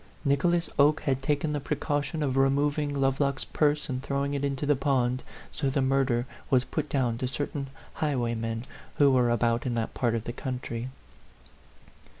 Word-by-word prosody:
Nicholas 170 +5 +2
Oke 150 +2 +5
had 135 -2 0
taken 150 +2 0
the 145 - 0
precaution 145 +2 -1
of 135 -3 0
removing 145 +2 +2
Lovelock's 135 0 +1
purse 150 -1 +1
and 130 -2 -3
throwing 140 +1 -1
it 140 -1 -2
into 140 0 -1
the 145 0 +3
pond, 130 -2 +1 0.3
so 140 -3 -1
the 135 - 0
mur 135 +1 +3
der 120 -1 0 0.2
was 130 -2 +4
put 150 +2 -3
down 125 -4 0
to 130 - -1
certain 140 +1 -3 0.3
highwaymen 115 -5 -1 0.3
who 140 -2 +5
were 125 -2 +3
about 120 +1 +1
in 120 - -1
that 115 -1 -2
part 120 -2 +1
of 115 - -2
the 120 - -5
country. 125 -2 -4
135 Hz, 170 wpm, -28 LUFS, 125-145 Hz, 0.3 s, Oke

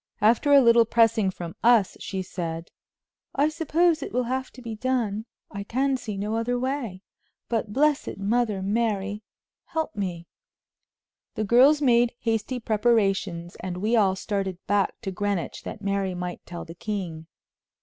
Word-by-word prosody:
After 230 +6 +3
a 280 -1 +8
little 235 -1 +6
pressing 225 -3 +3
from 175 -2 -7
us 230 -4 +4
she 190 -1 -4
said: 165 -2 -5 0.6
"I 285 +2 +3
suppose 325 +1 +2
it - - -5
will 250 +1 +1
have 260 +2 -2
to - - -12
be 230 -2 -5
done; 220 -3 -1 0.3
I 200 0 -5
can 265 +6 0
see 225 -6 -5
no 210 +3 -2
other 245 +2 0
way; 245 -7 -3 0.5
but 220 -3 -1
blessed 295 +4 +1
Mother 210 -1 0
Mary!... 205 -1 -1 0.4
help 320 -6 -3
me!" 180 -4 -3 1.1
The 215 - -1
girls 265 +8 +5
made 240 -2 +4
hasty 230 +2 -1
preparations, 200 -6 +1
and 180 0 -4
we 215 +5 +1
all 195 -4 +3
started 195 -2 -2
back 205 -1 +1
to 195 - -4
Greenwich 200 -1 -2
that 205 - -7
Mary 195 -2 -1
might 180 0 -5
tell 175 -1 -7
the 165 - -9
king. 175 -5 -5
215 Hz, 155 wpm, -25 LUFS, 195-245 Hz, 1.1 s, a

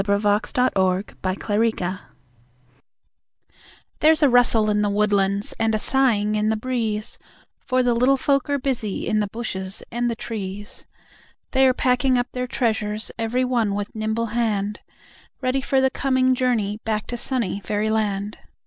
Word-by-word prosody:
The 200 0 +1
Flight 205 +6 0
of 250 +1 +3 0.5
the 185 0 -1
Fairies 220 +2 +1 2.2
There's 310 0 +5
a 285 - +6
rustle 240 -3 +5
in 210 0 +1
the 205 - +1
woodlands, 200 -1 +1
and 225 -1 +2
a - - +2
sighing 215 -4 +2
in 215 0 +1
the 220 - +1
breeze, 220 -2 -2 0.4
For 255 -1 0
the 245 -1 +2
Little 250 +4 +3
Folk 275 0 +1
are 285 - +1
busy 250 -7 -2
in 215 - +1
the 210 - 0
bushes 195 -3 -4
and 240 +1 -1
the 230 - -2
trees; 205 -3 -6 0.6
They 265 0 +4
are 255 - +2
packing 255 0 +2
up 245 0 -2
their 250 0 -3
treasures, 220 -4 -1
every 240 +3 0
one 230 -5 0
with 205 0 -4
nimble 220 +1 -2
hand, 210 -3 -1 0.6
Ready 260 +1 0
for 270 0 +1
the 265 0 +2
coming 260 -1 +2
journey 230 -5 0
back 215 -1 -2
to 245 - -5
sunny 235 -5 0
Fairyland. 210 -1 -2
225 Hz, 160 wpm, -22 LUFS, 210-255 Hz, 2.2 s, a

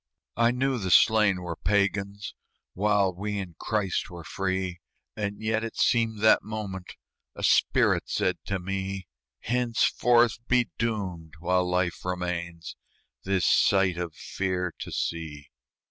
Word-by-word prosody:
I 115 0 +4
knew 130 +1 0
the 95 -3 -3
slain 105 -2 +5
were 85 -1 -4
Pagans, 100 +2 -1 0.4
While 100 -1 +2
we 105 +3 -4
in 95 -4 -5
Christ 100 -4 -1
were 85 -2 -9
free, 95 -2 -2 0.4
And 100 -1 -3
yet 110 0 0
it 115 - -5
seemed 115 -3 +2
that 110 - +6
moment 100 -4 -6 0.4
A - - -8
spirit - - +3
said 90 -1 0
to 100 - -1
me: 95 0 -4 0.4
"Henceforth 120 -1 +2
be 125 -1 +2
doomed 95 -9 -3
while 90 +1 +1
life 90 -1 0
remains 85 -2 -4 0.5
This 95 -3 +1
sight 95 -3 +3
of 85 -3 -4
fear 90 -2 -3
to - - -6
see." 75 -4 -4
95 Hz, 130 wpm, -27 LUFS, 90-110 Hz, 0.5 s, that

